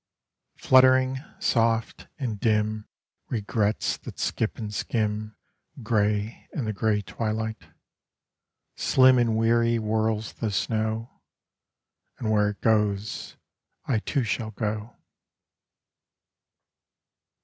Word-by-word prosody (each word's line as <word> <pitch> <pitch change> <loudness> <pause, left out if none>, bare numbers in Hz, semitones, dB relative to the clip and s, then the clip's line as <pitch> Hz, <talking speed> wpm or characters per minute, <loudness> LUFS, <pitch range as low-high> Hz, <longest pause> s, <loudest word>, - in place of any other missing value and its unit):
Fluttering, 130 0 +5 0.2
soft, 115 -1 +1
and 120 -8 -3
dim 110 -1 0 0.4
Regrets 105 -1 0
that - - -10
skip 110 - -1
and 105 -2 -5
skim 105 -1 -2 0.5
Grey 105 0 0
in 135 - -2
the 110 - -2
grey 105 0 0
twilight; 110 +1 -3 1.1
Slim 130 -1 +5
and 115 -2 +2
weary 115 +1 +3
whirls 110 -1 -1
the 110 - -3
snow, 110 +2 -2 1.0
And 110 -3 -2
where 105 -1 +3
it 105 - -8
goes 105 -2 0 0.5
I 120 -5 +1
too 135 +4 -1
shall 110 0 -2
go. 110 +1 -4
110 Hz, 95 wpm, -26 LUFS, 105-115 Hz, 1.1 s, Fluttering